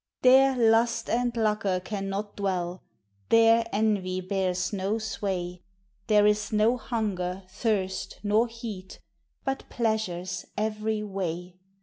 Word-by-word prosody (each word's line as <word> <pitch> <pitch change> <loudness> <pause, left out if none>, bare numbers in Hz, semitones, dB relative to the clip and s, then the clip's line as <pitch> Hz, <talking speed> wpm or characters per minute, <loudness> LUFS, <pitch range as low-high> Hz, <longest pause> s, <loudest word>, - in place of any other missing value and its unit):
There 265 +1 +6
lust 230 0 +3
and 245 +1 +1
lucre 210 -4 +1
cannot 195 +1 -4
dwell, 185 -3 -2 0.5
There 230 0 +5
envy 200 -3 0
bears 185 0 -1
no 200 +2 0
sway; 185 -5 -3 0.5
There 210 -1 +5
is 210 0 +2
no 215 +3 +3
hunger, 195 -6 -3
thirst, 190 -4 -2
nor 215 +3 +3
heat. 225 -5 -8 0.5
But 270 0 -3
pleasures 190 -6 -2
every 215 0 -1
way. 180 -3 -4
210 Hz, 110 wpm, -27 LUFS, 185-225 Hz, 0.5 s, There